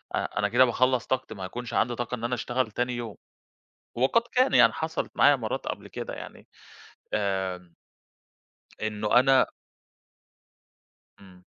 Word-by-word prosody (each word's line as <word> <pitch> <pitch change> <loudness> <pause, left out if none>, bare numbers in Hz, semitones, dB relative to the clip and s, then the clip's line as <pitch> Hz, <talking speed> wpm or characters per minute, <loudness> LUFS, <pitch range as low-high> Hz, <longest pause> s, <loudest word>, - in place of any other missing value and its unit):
أ - - 0 0.2
أنا 105 - +1
كده 125 +3 +5
باخلّص 130 0 +1
طاقتي 130 -3 -2
ما 95 - -7
هيكونش 120 +6 -7
عندي 120 0 +1
طاقة 120 +1 -3
إن 115 - -10
أنا 120 +1 0
أشتغل 120 -1 -2
تاني 125 +3 -1
يوم 120 -2 -6 0.8
وقد 130 - +3
كان 255 +2 +3
يعني - - +6
حصلت 160 0 -3
معايا 145 - +6
مرّات 115 -5 -4
قبل - - -5
كده - - -6
يعني - - -10 0.7
آمم 95 -3 -2 1.1
إنه 110 +2 +2
أنا 135 +1 +4 1.7
إمم. 90 -2 -17
120 Hz, 140 wpm, -27 LUFS, 105-130 Hz, 1.7 s, يعني